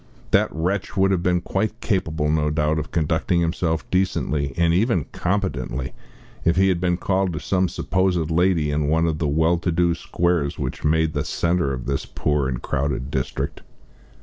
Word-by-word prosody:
That - - +4
wretch 90 +5 -2
would 95 0 +4
have 95 -3 +1
been 90 0 +1
quite 110 +5 -2
capable, 80 -9 -1
no 75 -1 +1
doubt, 75 +1 +1
of - - -5
conducting 80 +2 +1
himself 80 -1 -1
decently 75 -6 0
and 85 -1 +3
even 95 - +2
competently, 70 -9 -2 0.5
if 85 - +3
he 95 +1 +4
had 90 -2 +1
been 90 -1 +1
called 95 -1 0
to 75 - -3
some 95 -1 +1
supposed 90 -4 0
lady 85 -3 +2
in 75 0 0
one 80 +2 +2
of 80 -2 -1
the 80 - 0
well 80 +4 +2
to 85 - -1
do 85 +1 +2
squares 85 -3 -1
which - - -4
made 80 +1 +2
the 70 -1 -1
centre 85 -1 0
of 65 -2 -4
this 70 0 -2
poor 75 -2 0
and - - -4
crowded 65 -1 -2
district. 65 -3 -3
85 Hz, 180 wpm, -23 LUFS, 75-90 Hz, 0.5 s, That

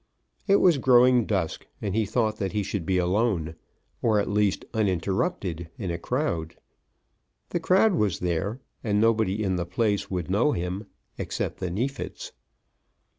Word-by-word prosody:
It 200 - +5
was 175 -7 +4
growing 125 -3 +5
dusk, - - -2
and 100 -3 -3
he 110 -1 +1
thought 110 -1 0
that 95 -1 -3
he 105 -1 0
should 95 -4 -4
be 95 - +2
alone, 90 -3 +1 0.5
or, 110 -2 +3
at 100 - 0
least, 105 -1 +1
uninterrupted 95 - -1
in 95 -6 -3
a 85 - -3
crowd. 85 - -2 0.9
The 175 - -1
crowd 190 +5 +4
was 105 - +1
there, 90 +7 -2 0.2
and 105 -3 +1
nobody 110 -2 +2
in 95 -2 0
the 85 - -2
place 100 +2 0
would 90 -4 -3
know 120 +9 +3
him, 90 +4 -3 0.3
except - - -3
the 90 - -2
Neefits. 135 - -4
105 Hz, 155 wpm, -26 LUFS, 90-120 Hz, 0.9 s, It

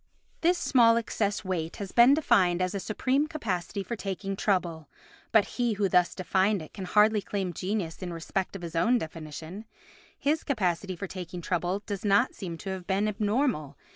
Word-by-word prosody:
This 345 +2 +3
small 235 -8 +4
excess 210 -3 -1
weight 170 -3 -2
has 200 -2 -6
been 245 +4 +7
defined 185 - +3
as 185 +1 0
a 200 - -2
supreme 260 +8 0
capacity 200 - -3
for 235 - -4
taking 195 -1 -4
trouble, 175 -7 -1 0.4
but 220 -2 +5
he 240 -2 -1
who 200 -1 +1
thus 180 -1 +3
defined 190 +2 +1
it 155 - -10
can 190 - -6
hardly 210 +3 +4
claim 195 -3 -3
genius 185 -1 -3
in 180 -1 -4
respect 175 +4 -3
of 185 - -7
his 165 -1 -6
own 235 +9 +3
definition—his 175 - -5
capacity 190 -6 -1
for 195 - -5
taking 180 -2 -7
trouble 180 +3 -1
does 200 -3 -4
not 205 +4 +3
seem 170 -4 -6
to 190 +4 -5
have 185 -2 -6
been 200 +2 +1
abnormal. 210 - 0
195 Hz, 175 wpm, -28 LUFS, 175-220 Hz, 0.4 s, been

